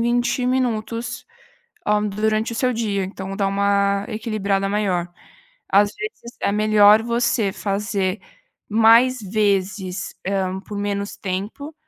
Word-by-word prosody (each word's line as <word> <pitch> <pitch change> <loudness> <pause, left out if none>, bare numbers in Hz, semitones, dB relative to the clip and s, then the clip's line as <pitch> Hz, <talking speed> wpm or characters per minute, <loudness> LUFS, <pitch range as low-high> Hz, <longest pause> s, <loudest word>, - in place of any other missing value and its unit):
20 240 +1 +1
minutos, 235 -2 -2 0.6
hã, 210 0 +2
durante 215 +2 0
o - - -5
seu 250 0 +1
dia, 205 -4 -1
então 190 0 -6
dá 195 - +1
uma 200 0 +1
equilibrada 210 -3 -1
maior. 195 -4 0 0.6
Às 205 +1 +4
vezes, 420 - -7
é - - +1
melhor 210 0 +5
você 235 -3 +1
fazer 200 -1 -2 0.5
mais 230 +3 +5
vezes, 195 -2 -1
hã, 190 -1 -1
por 205 +1 -8
menos 200 0 -3
tempo, 205 +11 -5
210 Hz, 120 wpm, -21 LUFS, 195-230 Hz, 0.6 s, melhor